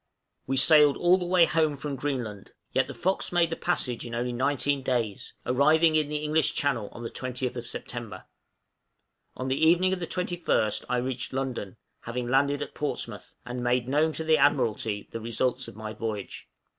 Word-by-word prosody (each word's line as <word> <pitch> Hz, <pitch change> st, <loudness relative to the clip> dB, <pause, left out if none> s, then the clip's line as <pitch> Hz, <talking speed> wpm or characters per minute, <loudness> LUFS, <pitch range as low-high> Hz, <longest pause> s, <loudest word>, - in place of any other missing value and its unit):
We 135 Hz, 0 st, 0 dB
sailed 150 Hz, +1 st, +6 dB
all 180 Hz, +2 st, +4 dB
the 175 Hz, -, -3 dB
way 180 Hz, -1 st, +5 dB
home 155 Hz, -2 st, +1 dB
from 140 Hz, 0 st, -4 dB
Greenland, 125 Hz, -7 st, -4 dB, 0.2 s
yet -, -, +2 dB
the -, -, -7 dB
'Fox' 190 Hz, +2 st, 0 dB
made 170 Hz, -2 st, +2 dB
the -, -, -1 dB
passage 130 Hz, -10 st, -1 dB
in 120 Hz, -1 st, -6 dB
only 120 Hz, +1 st, -2 dB
nineteen 140 Hz, +2 st, 0 dB
days, 120 Hz, -6 st, -2 dB
arriving 155 Hz, +5 st, +4 dB
in 155 Hz, -2 st, +2 dB
the 150 Hz, -, -4 dB
English 155 Hz, -1 st, +2 dB
Channel 120 Hz, -8 st, 0 dB
on 120 Hz, -, -9 dB
the 115 Hz, -, -4 dB
20th 125 Hz, -1 st, -4 dB
September; 120 Hz, -1 st, -7 dB, 1.1 s
on 130 Hz, -, -3 dB
the 135 Hz, +4 st, 0 dB
evening 175 Hz, +3 st, +4 dB
of 190 Hz, -, -2 dB
the 170 Hz, -, -4 dB
21st 175 Hz, -, 0 dB
I 125 Hz, -, +1 dB
reached 125 Hz, 0 st, -3 dB
London 130 Hz, -6 st, -4 dB, 0.2 s
(having 120 Hz, +1 st, -4 dB
landed 140 Hz, +3 st, +2 dB
at -, -, -10 dB
Portsmouth), 115 Hz, -7 st, -4 dB
and 125 Hz, 0 st, -5 dB
made 120 Hz, 0 st, +1 dB
known 150 Hz, +4 st, +2 dB
to 160 Hz, -, -1 dB
the 160 Hz, 0 st, +3 dB
Admiralty 115 Hz, -7 st, +1 dB
the 115 Hz, -, -5 dB
result 125 Hz, +3 st, -1 dB
of -, -, -10 dB
my 110 Hz, 0 st, -6 dB
voyage. 110 Hz, -2 st, -5 dB
130 Hz, 180 wpm, -27 LUFS, 120-155 Hz, 1.1 s, sailed